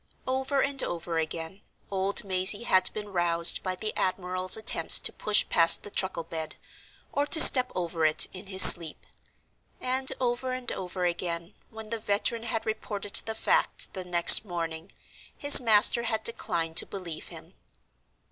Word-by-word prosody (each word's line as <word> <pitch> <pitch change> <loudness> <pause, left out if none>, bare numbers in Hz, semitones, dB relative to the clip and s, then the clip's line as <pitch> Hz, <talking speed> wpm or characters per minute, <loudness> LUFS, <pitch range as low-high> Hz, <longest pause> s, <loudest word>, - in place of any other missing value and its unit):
Over 265 +1 -4
and 275 -1 -4
over 170 -1 -7
again, 165 +4 -8 0.3
old 195 +1 -2
Mazey 190 +3 +1
had 185 -5 0
been 210 -1 -10
roused 170 -2 0
by 185 -1 -6
the 215 +3 -7
admiral's 185 0 -3
attempts 220 +1 +2
to - - -6
push 210 -1 -1
past 165 -1 +3
the 205 - -12
truckle 190 -4 -5
bed, 160 -1 -8 0.6
or 285 +1 -4
to 320 - +5
step 255 -4 +8
over 170 -2 -6
it, 155 0 +3
in 190 +1 -13
his 190 -1 +5
sleep; 165 -3 +8 0.7
and 260 +1 -1
over 255 +1 -5
and 255 -1 -3
over 180 0 -8
again, 170 +1 -7 0.2
when 220 -1 -14
the 230 - -5
veteran 215 +2 -4
had 225 -1 -7
reported 205 -2 -8
the 220 - -6
fact - - -3
the 185 - -9
next 175 +1 +4
morning, 170 -2 -9 0.5
his 285 -2 +7
master 225 0 +2
had 225 -2 -6
declined 165 -7 -5
to - - +1
believe 175 -5 -11
him. - - -13
195 Hz, 160 wpm, -24 LUFS, 175-225 Hz, 0.7 s, step